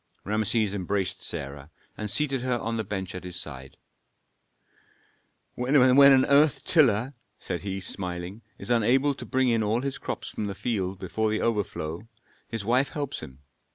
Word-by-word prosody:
Rameses 110 0 +1
embraced 95 -1 -2
Sarah, 70 +1 -6 0.3
and 105 - -4
seated 135 +2 +1
her 125 -1 0
on 115 0 -3
the 110 - -1
bench 95 -2 -4
at 90 - -7
his 90 -1 -4
side. 65 -5 -8 1.8
"When 125 +4 -1
an 135 0 +7
earth 145 +1 +4
tiller," 130 - +3 0.2
said 90 - -4
he, 95 -1 -4
smiling, 90 +1 -5 0.2
"is - - -5
unable 130 +5 +3
to - - -9
bring 130 -1 +2
in 115 -1 +2
all 110 +3 +1
his 140 0 -4
crops - - -5
from 105 - -3
the 100 - -5
field 100 -4 -2
before 110 +4 -1
the 110 - -1
overflow, 100 -4 -2 0.4
his 115 -3 -5
wife 125 +5 +2
helps 145 -2 -4
him. 65 +2 -11
110 Hz, 160 wpm, -27 LUFS, 95-130 Hz, 1.8 s, an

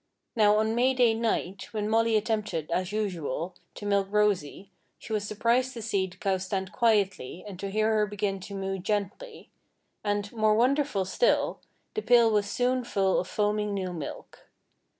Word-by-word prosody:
Now, 210 -2 +5
on 220 +1 +1
May 255 +3 +2
Day 245 -3 +4
night, 220 -4 -2
when 210 -1 -1
Molly 225 0 +3
attempted, 210 -7 -2
as 180 +2 -1
usual, 180 -5 -3 0.2
to 205 - -8
milk 200 -1 +2
Rosy, 200 -3 0 0.3
she 220 - -7
was 205 -1 -1
surprised 235 +5 +1
to 230 - -6
see 200 -4 0
the 180 0 -15
cow 190 0 0
stand 190 0 -3
quietly 200 - 0
and 190 -3 -9
to 200 - -4
hear 215 +2 +1
her 210 -1 +2
begin 205 -1 -2
to 200 +2 -8
moo 195 0 -3
gently; 210 - -4 0.5
and, 205 0 -1
more 215 -2 +3
wonderful 255 -3 +2
still, - - +1 0.3
the 430 - -2
pail 235 - +5
was 205 -1 +1
soon 250 +1 +1
full 195 -5 +1
of 180 - -3
foaming 210 -1 0
new 185 -2 -3
milk. 160 -5 -8
210 Hz, 170 wpm, -28 LUFS, 195-225 Hz, 0.5 s, Now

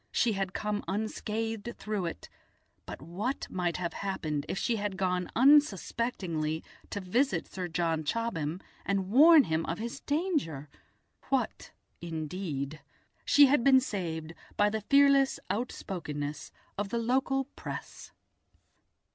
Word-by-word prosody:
She 230 - +2
had 195 -1 -3
come 210 -1 -2
unscathed 220 +2 -3
through 210 -5 -2
it, 165 - -7 0.6
but - - -8
what 205 - -3
might 175 -2 -1
have 175 -2 -3
happened 155 -7 -3
if - - -2
she 230 +3 0
had 205 -2 -3
gone 180 -2 0
unsuspectingly 205 - +2 0.3
to 205 - -3
visit 235 +9 +1
Sir 185 -1 -5
John 165 -1 0
Chobham 175 -3 -2 0.2
and 195 -1 -1
warn 305 +5 +8
him 160 -4 0
of 165 - -2
his 235 +2 -5
danger? 285 - -1 0.6
What - - -1 0.3
indeed! 155 -3 -4 0.4
She 290 - +7
had 275 -2 +3
been 265 0 +7
saved 165 -9 -4 0.2
by 205 0 +4
the 220 0 -2
fearless 275 +3 +4
outspokenness 150 - -4 0.3
of 205 -1 -2
the 235 - -1
local 265 +3 +1
Press. - - -7
195 Hz, 130 wpm, -30 LUFS, 165-235 Hz, 0.6 s, warn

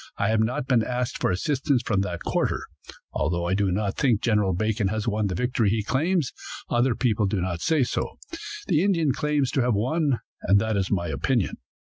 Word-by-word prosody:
I 100 - +1
have 110 0 +2
not 115 +3 0
been 125 -4 +3
asked 125 +2 -2
for - - +2
assistance 130 - 0
from 100 -3 +1
that 90 -3 -4
quarter. - - -1 0.5
Although 85 +3 0
I 90 - 0
do 100 -1 +1
not 100 +1 -1
think 125 -7 +3
General 105 -4 +2
Bacon 110 +2 0
has 110 +3 -2
won 105 -1 +1
the 95 - -2
victory 120 0 +1
he 110 +1 0
claims, 155 - 0 0.4
other 120 0 +2
people 110 -5 +1
do 100 0 -1
not 90 -2 -2
say 155 -4 +2
so. - - -3 0.5
The 160 0 +2
Indians 165 -9 +2
claim 150 -2 +1
to 130 +1 0
have 120 -2 +2
won, 135 +4 +1 0.2
and 100 - +4
that 110 +1 0
is 95 -2 0
my 90 -4 0
opinion. 120 +4 0
110 Hz, 200 wpm, -25 LUFS, 100-130 Hz, 0.5 s, and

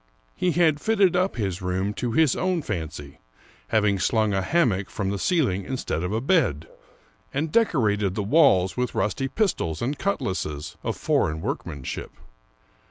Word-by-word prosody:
He 180 -2 0
had 160 -3 +3
fitted 200 -5 +3
up 185 +2 +1
his 95 -6 -2
room 95 +3 -1
to 120 +1 -3
his 155 0 +3
own 185 -4 0
fancy, 80 - -5 0.5
having 105 - +2
slung 110 0 +1
a 95 - +1
hammock 100 - +1
from 100 -2 -2
the 100 - -3
ceiling 125 - +1
instead 110 -6 -3
of 90 +2 -2
a 110 - 0
bed, 120 - +1 0.6
and 150 +3 -2
decorated 105 - +2
the 105 - -1
walls 100 - +4
with 125 -1 -2
rusty 105 +7 0
pistols 135 - -1
and 140 +5 -2
cutlasses 95 - -2
of - - -3
foreign 75 +1 +1
work - - -3
manship. 70 -3 -6
110 Hz, 160 wpm, -25 LUFS, 95-155 Hz, 0.6 s, walls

